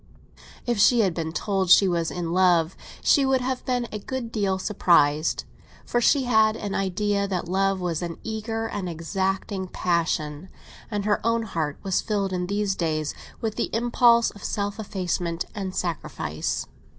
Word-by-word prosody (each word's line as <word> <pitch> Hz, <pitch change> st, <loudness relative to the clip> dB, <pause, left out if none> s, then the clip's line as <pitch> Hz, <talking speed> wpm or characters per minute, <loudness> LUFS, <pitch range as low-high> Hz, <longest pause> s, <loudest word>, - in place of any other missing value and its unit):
If 240 Hz, -3 st, 0 dB
she 235 Hz, +3 st, +6 dB
had 190 Hz, -5 st, +2 dB
been 160 Hz, -1 st, -3 dB
told 190 Hz, +1 st, -1 dB
she 195 Hz, +2 st, +7 dB
was 170 Hz, -2 st, 0 dB
in 170 Hz, -2 st, -4 dB
love, 175 Hz, -2 st, +3 dB, 0.3 s
she 285 Hz, -, +5 dB
would 265 Hz, -1 st, +2 dB
have 255 Hz, 0 st, -2 dB
been 245 Hz, -2 st, 0 dB
a 210 Hz, -, -4 dB
good 240 Hz, +2 st, -5 dB
deal 200 Hz, -4 st, 0 dB
surprised; 165 Hz, -6 st, +2 dB, 0.4 s
for 240 Hz, -, 0 dB
she 275 Hz, +3 st, +4 dB
had 220 Hz, -3 st, +4 dB
an 200 Hz, -2 st, -4 dB
idea 200 Hz, +1 st, 0 dB
that 180 Hz, -3 st, -2 dB
love 195 Hz, +1 st, +1 dB
was 175 Hz, -3 st, -2 dB
an 170 Hz, -1 st, -4 dB
eager 225 Hz, +1 st, -3 dB
and 200 Hz, -4 st, -4 dB
exacting 190 Hz, +3 st, -2 dB
passion, 170 Hz, -2 st, -1 dB, 0.4 s
and 205 Hz, -2 st, -2 dB
her 210 Hz, -1 st, +1 dB
own 230 Hz, 0 st, +1 dB
heart 160 Hz, -8 st, -3 dB
was 190 Hz, -1 st, +1 dB
filled 200 Hz, -3 st, -1 dB
in 180 Hz, -1 st, -1 dB
these 200 Hz, 0 st, 0 dB
days 155 Hz, -4 st, -1 dB, 0.3 s
with 220 Hz, -1 st, -2 dB
the -, -, 0 dB
impulse 235 Hz, 0 st, +4 dB
of 205 Hz, -, -14 dB
self 205 Hz, +1 st, -2 dB
effacement 180 Hz, -4 st, -2 dB
and 190 Hz, -2 st, -4 dB
sacrifice. 150 Hz, -, -3 dB
195 Hz, 165 wpm, -25 LUFS, 175-220 Hz, 0.4 s, she